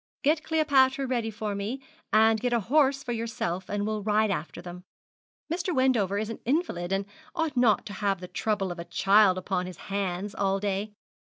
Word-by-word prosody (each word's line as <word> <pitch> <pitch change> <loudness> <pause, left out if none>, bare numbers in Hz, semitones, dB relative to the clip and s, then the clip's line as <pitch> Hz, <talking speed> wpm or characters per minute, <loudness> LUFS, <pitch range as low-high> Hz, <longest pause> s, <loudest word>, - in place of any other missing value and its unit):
'Get 310 +2 +2
Cleopatra 275 -4 +3
ready 240 -3 -1
for 215 -1 -4
me, 205 +7 -3 0.3
and 220 +1 +5
get 245 0 0
a 235 - +3
horse 275 +5 +2
for 250 - -4
yourself, 220 -6 -3
and 205 0 -1
we'll 215 0 -2
ride 215 0 +2
after 175 -3 -4
them. 175 +1 -9 0.7
Mr. 350 -1 -2
Wendover 235 -7 +2
is 215 +2 -2
an - - -7
invalid, 240 - -1
and 195 0 0 0.3
ought 320 -5 -1
not 240 -5 +3
to 205 - -7
have 195 -2 -1
the 180 - -7
trouble 200 -1 -1
of 175 - -7
a 170 - -5
child 195 -1 +4
upon 185 -1 -2
his 180 -3 -9 0.2
hands 195 0 -2
all 195 0 0
day. 205 +1 -2
215 Hz, 190 wpm, -27 LUFS, 195-255 Hz, 0.7 s, and